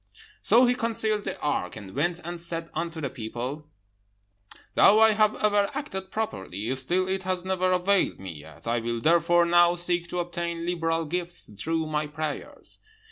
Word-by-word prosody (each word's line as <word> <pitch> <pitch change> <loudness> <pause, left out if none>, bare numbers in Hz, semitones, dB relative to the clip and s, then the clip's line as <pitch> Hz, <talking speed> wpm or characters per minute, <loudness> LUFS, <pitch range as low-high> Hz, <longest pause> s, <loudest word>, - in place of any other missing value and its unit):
"So 235 +4 +6
he 245 - +3
concealed 220 -3 -1
the - - -4
ark, 145 -11 -1
and 100 -3 -10
went 170 +5 0
and 175 +1 -5
said 165 -1 -3
unto 165 0 -3
the 140 - -2
people, 125 +6 -6 1.1
'Though 210 +2 +6
I 220 0 +7
have 215 0 +3
ever 205 -1 +2
acted 190 -11 -5
properly, 110 - -3
still 175 +8 0
it 190 0 -1
has 185 -1 -2
never 185 -1 +1
availed 185 +2 +2
me 95 -2 -7
yet. 75 0 -13
I 115 +1 0
will 115 0 -3
therefore 170 +5 +4
now 175 0 +5
seek 175 0 +2
to 180 +1 -3
obtain 170 -1 -3
liberal 165 -2 -1
gifts 175 -3 -3
through 160 +9 -1
my 155 -1 -1
prayers.' 150 0 -6
170 Hz, 170 wpm, -26 LUFS, 150-185 Hz, 1.1 s, I